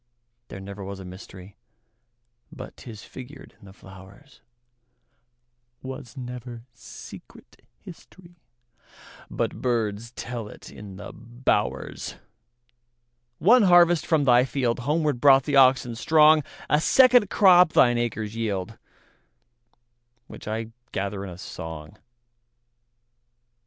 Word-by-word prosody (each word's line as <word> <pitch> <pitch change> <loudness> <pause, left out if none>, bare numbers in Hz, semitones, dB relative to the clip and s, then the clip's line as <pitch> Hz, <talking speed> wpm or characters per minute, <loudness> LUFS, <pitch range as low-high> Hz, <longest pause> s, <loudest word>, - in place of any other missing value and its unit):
There - - -9
was 95 - -10 0.3
never 95 +1 -12 1.0
mysteryBut - - -10
'tis 110 -4 -11
figured 135 +2 -12
in - - -18
the 95 - -13
flowers; 95 +8 -16 1.4
SWas 130 0 -9
never 125 -2 -8
secret 115 - -14 0.2
historyBut 175 0 -15 1.2
birds 115 -2 -2
tell 120 -3 -6
it - - -13
in 100 -2 -11
the - - -10
bowers. 120 +2 -3 1.2
One 240 +7 +5
harvest 175 -3 +4
from 160 -4 +2
thy 125 -2 +5
fieldHomeward 135 +3 -1
brought 135 0 +5
the 145 0 0
oxen 130 -2 +4
strong;A 155 +2 +2
second 250 -1 +5
crop 180 -4 +5
thine 120 -1 +4
acres 110 -2 -4
yield, 105 -2 -4 1.5
Which - - -12
I 110 +1 -4 0.2
gather 100 0 -4
in 100 - -7
a 85 - -10
song. 80 -1 -9
120 Hz, 100 wpm, -24 LUFS, 105-150 Hz, 1.5 s, One